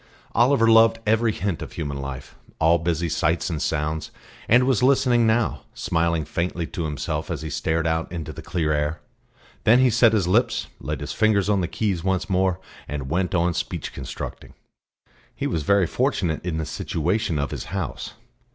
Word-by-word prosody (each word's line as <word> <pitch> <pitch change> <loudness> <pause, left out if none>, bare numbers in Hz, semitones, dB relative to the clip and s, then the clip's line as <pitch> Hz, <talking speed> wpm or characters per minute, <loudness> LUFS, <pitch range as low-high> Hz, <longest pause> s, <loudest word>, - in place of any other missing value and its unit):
Oliver 120 0 +4
loved 115 0 +6
every 110 +1 +3
hint 100 -4 -3
of - - -7
human 70 -4 -4
life 70 -1 -7 0.3
all 80 +1 +4
busy 85 0 -1
sights 85 +2 0
and 80 -2 -3
sounds 75 +1 -2 0.4
and 125 +3 +6
was 130 -3 +2
listening 125 -3 +4
now, 110 0 +1
smiling 85 -2 0
faintly 85 +2 -2
to 85 0 -4
himself 75 -3 -3
as - - -4
he 80 - -5
stared 80 +2 -1
out 80 0 -1
into 85 -4 -5
the - - -9
clear 80 -3 -1
air. 75 +2 -1 0.6
Then 115 +3 +6
he 130 -1 +4
set 115 0 +5
his 100 -5 +2
lips, 110 +7 +2
laid - - -4
his - - -4
fingers 105 -2 +2
on 100 -2 +2
the 85 - -1
keys 95 -4 -2
once 95 0 -1
more, 95 -1 +1 0.3
and 70 -2 -5
went 90 +2 0
on 85 0 +2
speech - - -4
constructing. - - -7 0.8
He - - -3
was 80 - -1
very 100 +4 +3
fortunate 80 -1 -1
in 85 -3 -2
the 80 - -2
situation 85 +3 -1
of 70 -3 -2
his - - -5
house. - - -4
85 Hz, 180 wpm, -23 LUFS, 80-110 Hz, 0.8 s, loved